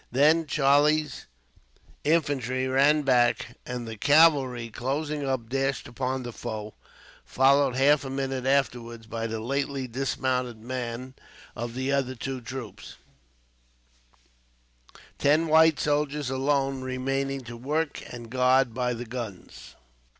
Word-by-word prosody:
Then 155 Hz, +5 st, +4 dB
Charlie's 145 Hz, +1 st, +2 dB, 0.8 s
infantry 135 Hz, -5 st, +1 dB
ran 140 Hz, +3 st, +3 dB
back; 120 Hz, -2 st, +2 dB
and 125 Hz, -2 st, -5 dB
the 110 Hz, -1 st, -7 dB
cavalry, 140 Hz, -4 st, +4 dB
closing 145 Hz, +5 st, -3 dB
up, 130 Hz, -4 st, -2 dB
dashed 135 Hz, +3 st, -1 dB
upon 130 Hz, +1 st, -3 dB
the 120 Hz, -1 st, -7 dB
foe, 105 Hz, -1 st, -6 dB, 0.5 s
followed 135 Hz, 0 st, +3 dB
half 140 Hz, +2 st, +4 dB
a 135 Hz, -, -5 dB
minute 135 Hz, -1 st, -3 dB
afterwards 120 Hz, -4 st, 0 dB
by 115 Hz, +1 st, -4 dB
the 110 Hz, 0 st, -4 dB
lately 135 Hz, +2 st, -2 dB
dismounted 125 Hz, -1 st, -2 dB
men 125 Hz, +2 st, -5 dB, 0.4 s
of 120 Hz, 0 st, -5 dB
the 130 Hz, +1 st, -1 dB
other 135 Hz, -2 st, 0 dB
two 130 Hz, +1 st, -5 dB
troops; 115 Hz, -4 st, -8 dB, 2.2 s
ten 150 Hz, +3 st, +3 dB
white 160 Hz, -1 st, +5 dB
soldiers, 145 Hz, -2 st, 0 dB
alone, 135 Hz, 0 st, 0 dB
remaining 135 Hz, +1 st, -2 dB
to 120 Hz, -1 st, -9 dB
work 150 Hz, +6 st, -2 dB
and 120 Hz, -2 st, -9 dB
guard 130 Hz, -1 st, +3 dB
the 125 Hz, -1 st, -2 dB
guns. 115 Hz, -5 st, -8 dB
130 Hz, 120 wpm, -26 LUFS, 120-140 Hz, 2.2 s, white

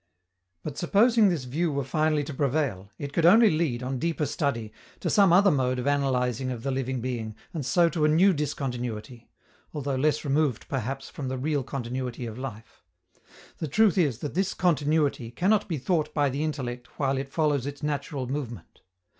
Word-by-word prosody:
But, 145 Hz, -2 st, -5 dB
supposing 215 Hz, +4 st, +4 dB
this 165 Hz, -7 st, -1 dB
view 155 Hz, +7 st, -1 dB
were 140 Hz, -1 st, -1 dB
finally 155 Hz, +2 st, +1 dB
to 150 Hz, +1 st, -6 dB
prevail, 135 Hz, -9 st, -1 dB
it 140 Hz, -1 st, -6 dB
could 170 Hz, -, +1 dB
only 220 Hz, +6 st, +7 dB
lead, 155 Hz, -7 st, 0 dB
on 130 Hz, 0 st, -3 dB
deeper 165 Hz, -1 st, -1 dB
study, 135 Hz, -7 st, -2 dB, 0.3 s
to -, -, -1 dB
some 200 Hz, -4 st, +5 dB
other 195 Hz, +3 st, +6 dB
mode 130 Hz, -2 st, +1 dB
of 125 Hz, -, -3 dB
analyzing 130 Hz, -3 st, 0 dB
of 120 Hz, -3 st, -5 dB
the 135 Hz, -, -1 dB
living 130 Hz, -1 st, -2 dB
being, 115 Hz, -3 st, -4 dB, 0.2 s
and 160 Hz, -4 st, -3 dB
so 170 Hz, +7 st, +3 dB
to 155 Hz, -1 st, 0 dB
a -, -, +5 dB
new 175 Hz, +6 st, +5 dB
discontinuity 125 Hz, -6 st, -4 dB, 0.5 s
although 140 Hz, -2 st, -2 dB
less 150 Hz, +3 st, +1 dB
removed, 140 Hz, -3 st, 0 dB
perhaps, 135 Hz, +1 st, -3 dB
from 140 Hz, -, -5 dB
the 130 Hz, 0 st, -3 dB
real 145 Hz, +2 st, 0 dB
continuity 125 Hz, -1 st, -4 dB
of 115 Hz, +1 st, -7 dB
life. 115 Hz, -4 st, -8 dB, 0.8 s
The 160 Hz, -, -2 dB
truth 210 Hz, +6 st, +3 dB
is 150 Hz, -, +2 dB
that 145 Hz, -, -4 dB
this 190 Hz, +2 st, 0 dB
continuity 150 Hz, -7 st, +1 dB
cannot 200 Hz, -, +1 dB
be 165 Hz, -5 st, -2 dB
thought 155 Hz, +2 st, 0 dB
by 145 Hz, -3 st, +2 dB
the 140 Hz, +4 st, -2 dB
intellect 125 Hz, -6 st, -5 dB
while 135 Hz, -2 st, 0 dB
it 135 Hz, 0 st, -6 dB
follows 145 Hz, -4 st, +1 dB
its 145 Hz, +1 st, -7 dB
natural 145 Hz, -2 st, -2 dB
movement. 125 Hz, -, -6 dB
140 Hz, 185 wpm, -27 LUFS, 125-155 Hz, 0.8 s, only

